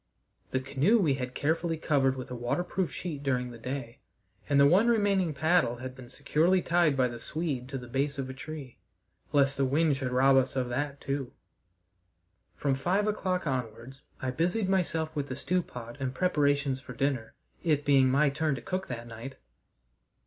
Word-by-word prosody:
The 130 Hz, -, 0 dB
canoe 140 Hz, -, +2 dB
we 165 Hz, -10 st, +3 dB
had 125 Hz, -1 st, -4 dB
carefully 165 Hz, +2 st, 0 dB
covered 135 Hz, -4 st, +2 dB
with 130 Hz, -1 st, -7 dB
a -, -, -3 dB
waterproof 175 Hz, +9 st, -1 dB
sheet 155 Hz, -6 st, -5 dB
during 125 Hz, -3 st, -1 dB
the 120 Hz, -, -11 dB
day, 125 Hz, 0 st, -5 dB, 0.5 s
and 140 Hz, -1 st, +4 dB
the 140 Hz, -, +7 dB
one 185 Hz, +10 st, +5 dB
remaining 200 Hz, -6 st, +2 dB
paddle 155 Hz, -2 st, +2 dB
had 130 Hz, +1 st, -7 dB
been 130 Hz, -2 st, -12 dB
securely 160 Hz, +7 st, +2 dB
tied 170 Hz, -5 st, +2 dB
by 130 Hz, -1 st, +4 dB
the 120 Hz, -1 st, -7 dB
Swede 145 Hz, -5 st, -3 dB
to 135 Hz, -, -4 dB
the 125 Hz, -1 st, -8 dB
base 135 Hz, +3 st, -1 dB
of 135 Hz, -1 st, -3 dB
a 130 Hz, -, -6 dB
tree, 140 Hz, -2 st, -8 dB, 0.5 s
lest 140 Hz, -1 st, +3 dB
the 140 Hz, -, +2 dB
wind 145 Hz, +3 st, +2 dB
should 130 Hz, -1 st, -3 dB
rob 135 Hz, +2 st, +5 dB
us 130 Hz, -, +2 dB
of 125 Hz, -2 st, -1 dB
that 140 Hz, +3 st, -3 dB
too. 135 Hz, -2 st, -3 dB, 1.2 s
From 140 Hz, -2 st, 0 dB
five 180 Hz, +10 st, +1 dB
o'clock 185 Hz, -4 st, -1 dB
onwards 130 Hz, -1 st, -4 dB, 0.2 s
I 130 Hz, -, -2 dB
busied 175 Hz, -, 0 dB
myself 165 Hz, -4 st, 0 dB
with 145 Hz, -2 st, -2 dB
the 130 Hz, -, -4 dB
stew 180 Hz, +6 st, 0 dB
pot 120 Hz, -6 st, -9 dB
and 130 Hz, -1 st, -3 dB
preparations 145 Hz, -5 st, +1 dB
for 130 Hz, -1 st, -10 dB
dinner, 130 Hz, -3 st, -1 dB, 0.3 s
it 150 Hz, -3 st, +1 dB
being 135 Hz, -2 st, +5 dB
my 140 Hz, +2 st, +3 dB
turn 150 Hz, 0 st, 0 dB
to 125 Hz, -, -7 dB
cook 185 Hz, +1 st, -3 dB
that 120 Hz, -2 st, -5 dB
night. 115 Hz, +3 st, -8 dB
140 Hz, 185 wpm, -29 LUFS, 130-160 Hz, 1.2 s, the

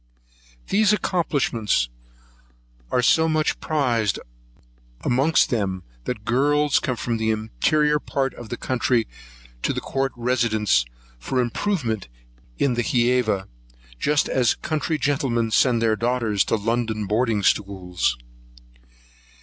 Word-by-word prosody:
These 210 Hz, +1 st, +4 dB
accomplishments 135 Hz, -, 0 dB, 1.0 s
are 125 Hz, -, +1 dB
so 160 Hz, +6 st, +4 dB
much 155 Hz, -1 st, 0 dB
prized 120 Hz, -9 st, 0 dB, 0.8 s
amongst 135 Hz, +6 st, +2 dB
them 95 Hz, -6 st, -1 dB, 0.2 s
that 110 Hz, -4 st, -4 dB
girls 145 Hz, +4 st, +2 dB
come 125 Hz, -, -2 dB
from 115 Hz, 0 st, -2 dB
the 110 Hz, 0 st, -1 dB
interior 150 Hz, +8 st, +1 dB
parts 135 Hz, -2 st, -2 dB
of 120 Hz, -2 st, -10 dB
the 120 Hz, -, -4 dB
country 120 Hz, -2 st, 0 dB, 0.5 s
to -, -, 0 dB
the -, -, -2 dB
court 135 Hz, -1 st, -2 dB
residence, 115 Hz, -, +1 dB, 0.3 s
for 130 Hz, -, -2 dB
improvement 120 Hz, -, -1 dB, 0.5 s
in 140 Hz, -3 st, +2 dB
the 120 Hz, -, 0 dB
Hæva, 120 Hz, -5 st, +1 dB, 0.5 s
just 150 Hz, -1 st, +2 dB
as 125 Hz, -3 st, +2 dB
country 155 Hz, +1 st, -2 dB
gentlemen 130 Hz, -5 st, 0 dB
send 120 Hz, 0 st, +3 dB
their 110 Hz, -1 st, +3 dB
daughters 115 Hz, -4 st, +1 dB
to -, -, +1 dB
London 110 Hz, 0 st, -1 dB
boarding 110 Hz, 0 st, 0 dB
schools. 95 Hz, -4 st, 0 dB
120 Hz, 115 wpm, -23 LUFS, 110-140 Hz, 1.0 s, These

